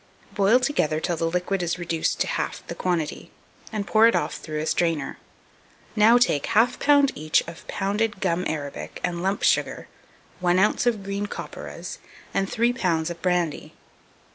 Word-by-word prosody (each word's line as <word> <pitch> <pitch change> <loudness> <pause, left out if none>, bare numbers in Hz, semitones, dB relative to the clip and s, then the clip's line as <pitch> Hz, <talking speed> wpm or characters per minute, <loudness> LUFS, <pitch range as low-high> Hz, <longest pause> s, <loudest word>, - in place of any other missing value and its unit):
Boil 205 +5 +4
together 155 - 0
till 175 +1 -1
the 165 0 -1
liquid 180 +2 -1
is 175 0 -1
reduced 170 -2 -1
to - - +2
half - - -3
the - - -5
quantity, 175 -4 -2 0.4
and 210 -2 -3
pour 220 +2 +5
it 230 - +3
off - - 0
through 155 -1 -6
a 155 - -2
strainer. 165 -4 0 0.8
Now 220 +3 +6
take 240 - +2
1/2 235 +4 +2
lb. 285 -1 +4
each 155 +1 +1
of 170 -1 -10
pounded 205 +1 -1
gum 180 -2 0
arabic 145 -3 -5
and 175 -1 -2
lump 195 +2 -1
sugar, - - +1 0.5
1 180 0 +2
oz. 210 +5 +2
of 220 -5 +1
green 200 +1 -3
copperas, - - -7 0.3
and 195 0 0
3 240 +1 +2
lbs. 170 -8 0
of 170 - -9
brandy. 175 -4 -1
185 Hz, 165 wpm, -24 LUFS, 165-215 Hz, 0.8 s, Now